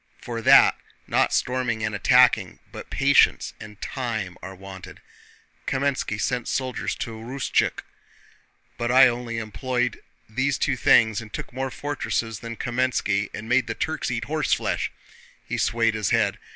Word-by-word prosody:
For 115 -1 -5
that, - - +7 0.3
not - - +1
storming 125 -3 0
and 110 0 -1
attacking - - +4
but - - -9
patience - - +3
and 105 -1 -11
time 110 -9 -4
are 95 +1 -8
wanted. 95 -1 -11 0.7
Kámenski 135 -6 -1
sent 125 +2 -1
soldiers 130 -2 -2
to 115 - -5
Rustchuk, 120 +5 -1 1.0
but 120 0 0
I 130 +1 +8
only 120 -1 -3
employed 125 +2 -2 0.3
these 130 +5 0
two 135 - 0
things 110 -3 +4
and 110 -1 -11
took - - -7
more 130 +1 -2
fortresses 120 -6 -3
than 115 0 -7
Kámenski 120 -5 0
and 110 - -7
made 125 0 +2
them 115 - -4
Turks 160 -5 -2
eat 120 -1 -3
horseflesh!" 155 0 0 0.6
He - - -3
swayed 115 -1 +2
his 110 -2 -1
head. - - +1
120 Hz, 145 wpm, -24 LUFS, 110-130 Hz, 1.0 s, I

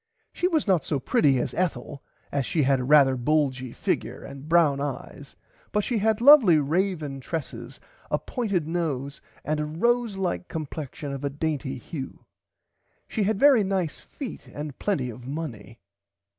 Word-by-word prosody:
She 355 - +1
was 320 -5 +1
not 185 -5 +3
so 145 - -1
pretty 135 +1 +3
as 120 - -2
Ethel 140 -6 -2 0.3
as 140 -1 0
she 155 +4 0
had 135 0 +3
rarther 135 +1 +5
a - - -3
bulgy 130 -2 0
figure - - -2
and 140 +2 -10
brown 155 -5 +4
eyes 140 -3 -6 0.4
but 210 - +1
she 235 0 0
had 220 +1 +2
lovely 245 - +8
raven 155 -2 -1
tresses 160 +3 -6 0.3
a - - +2
pointed 200 - -2
nose 150 -5 -3 0.2
and 155 0 0
a 150 - -1
rose 230 +7 0
like 185 -1 -2
complexion 150 -2 -6
of 135 0 -6
a 140 - 0
dainty 145 -2 -3
hue. 135 +2 -8 0.8
She 215 -4 -1
had 210 0 0
very 275 -6 +6
nice 190 -5 -1
feet 275 -5 -8
and 145 -2 -7
plenty 140 -12 -1
of 120 +2 -11
money. 140 -8 -6
155 Hz, 160 wpm, -26 LUFS, 140-190 Hz, 0.8 s, lovely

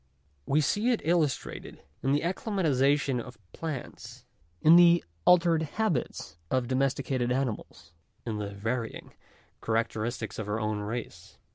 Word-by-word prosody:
We 150 +3 +3
see 205 - +1
it 240 - +1
illus 160 -4 +3
trated - - -9 0.2
in 135 - 0
the 145 +1 +2
acclimatization 145 - +1
of 125 0 -11 0.2
plants, 155 -6 -7 0.3
in 160 +2 +7
the 170 0 +7 0.2
altered 170 -2 +5
habits 160 - -2
of 130 -2 0
domesticated 130 -1 0
animals, 110 -9 -3 0.3
in 110 -3 -3
the 105 -1 -3
varying 110 +3 -4 0.5
characteristics 115 +1 -2
of 105 -1 -4
our 105 +2 -1
own 105 -1 -1
race. 105 -4 -6
130 Hz, 130 wpm, -28 LUFS, 115-160 Hz, 0.5 s, in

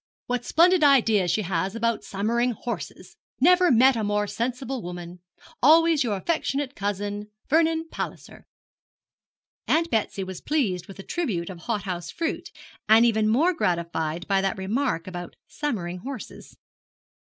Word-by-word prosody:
What 245 0 -2
splendid 350 0 +4
ideas 225 -10 +4
she 215 - +1
has 190 +2 -2
about 230 0 -1
summering 235 +5 0
hunters! 235 +2 -7 0.2
never 360 +5 +5
met 255 +1 +5
a 225 - -1
more 205 0 0
sensible 250 +3 -3
woman. 175 0 -8 0.4
Always 320 +1 +5
your 215 -5 -1
affectionate 280 - -1
cousin, 205 +1 -3 0.2
VERNON 325 +1 +2
PALLISER.' - - -7 1.2
Aunt 330 +1 +2
Betsy 215 -3 -1
was 185 -1 -7
pleased 200 - -1
with 195 - -11
the 195 - -8
tribute 195 - -3
of 180 - -10
hothouse 185 -5 -3
fruit, 330 -1 -3 0.4
and 225 +2 +7
even 220 -2 +2
more 310 +11 +3
gratified 170 - -2
by 195 -1 +2
that 195 +2 -1
remark 200 -1 -1
about 175 -1 -7
summering 180 - -3
horses. 260 +2 -9
220 Hz, 140 wpm, -25 LUFS, 190-275 Hz, 1.2 s, and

